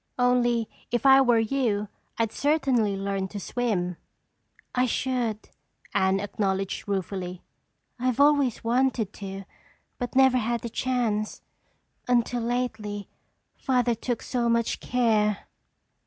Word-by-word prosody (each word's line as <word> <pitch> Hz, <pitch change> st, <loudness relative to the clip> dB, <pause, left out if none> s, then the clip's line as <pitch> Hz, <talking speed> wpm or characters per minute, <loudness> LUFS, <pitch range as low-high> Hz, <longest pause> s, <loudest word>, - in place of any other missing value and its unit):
Only 240 Hz, -2 st, +2 dB, 0.2 s
if 240 Hz, +1 st, -1 dB
I 270 Hz, 0 st, +8 dB
were 240 Hz, -3 st, +4 dB
you, 225 Hz, -3 st, 0 dB, 0.3 s
I'd 225 Hz, -2 st, 0 dB
certainly 265 Hz, -8 st, +1 dB
learn 195 Hz, -1 st, -2 dB
to 205 Hz, +2 st, -7 dB
swim." 190 Hz, -7 st, -1 dB, 0.8 s
"I 250 Hz, 0 st, +2 dB
should," 240 Hz, -3 st, -2 dB, 0.4 s
Anne 190 Hz, +1 st, +2 dB
acknowledged 195 Hz, -1 st, -2 dB
ruefully. 185 Hz, -2 st, -3 dB, 0.6 s
"I've 255 Hz, 0 st, 0 dB
always 285 Hz, -4 st, +3 dB
wanted 235 Hz, -3 st, +1 dB
to 195 Hz, -1 st, -7 dB, 0.6 s
but 245 Hz, -1 st, -4 dB
never 265 Hz, -1 st, +5 dB
had 235 Hz, 0 st, -1 dB
the 235 Hz, -, -5 dB
chance. 225 Hz, -4 st, -1 dB, 0.6 s
Until 245 Hz, 0 st, +1 dB
lately, 220 Hz, -4 st, -3 dB, 0.5 s
Father 250 Hz, -3 st, +1 dB
took 230 Hz, +1 st, -3 dB
so 240 Hz, -2 st, 0 dB
much 235 Hz, -1 st, +1 dB
care." 215 Hz, -4 st, +1 dB
235 Hz, 115 wpm, -26 LUFS, 205-250 Hz, 0.8 s, I